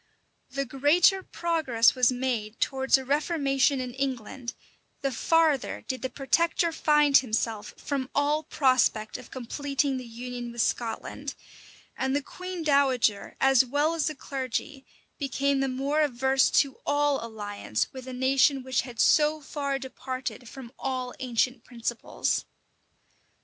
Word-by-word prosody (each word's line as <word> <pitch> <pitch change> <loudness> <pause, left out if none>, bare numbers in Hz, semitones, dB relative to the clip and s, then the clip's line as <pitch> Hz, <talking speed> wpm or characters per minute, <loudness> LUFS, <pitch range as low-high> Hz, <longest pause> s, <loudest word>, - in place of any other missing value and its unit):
The 275 +1 -2
greater 295 - +4
progress 315 -11 +2
was 255 -1 +3
made 245 -4 -2
towards 265 0 +2
a 265 - -7
reformation 280 -1 +1
in 250 -1 -4
England, 260 -2 -4 0.5
the 275 -1 0
farther 315 +2 +1
did 260 -2 -3
the 260 - -2
protector 335 +5 +1
find 300 -3 +3
himself 225 -4 +1
from 270 -3 -3
all 290 +2 +2
prospect 255 -7 +1
of - - -13
completing 275 +2 -2
the 255 -2 -7
union 240 +1 -6
with 235 -1 0
Scotland; 245 +4 -3 0.6
and 265 +1 -1
the 285 - 0
queen 365 +2 -6
dowager, 265 -8 +2
as 270 -1 +5
well 290 +5 +1
as 330 -3 0
the 310 - -2
clergy, 270 0 -4 0.3
became 280 0 0
the 270 - +1
more 275 +4 0
averse 265 -1 +2
to 275 -2 +2
all 290 -2 +1
alliance 205 - -3
with 260 -1 -9
a - - -5
nation 260 +1 +2
which 260 0 0
had 240 -2 -10
so 305 0 +4
far 280 -1 -3
departed 260 -2 -6
from 260 -4 -10
all 255 -2 -3
ancient 250 -1 0
principles. 235 -1 -2
265 Hz, 140 wpm, -27 LUFS, 250-285 Hz, 0.6 s, as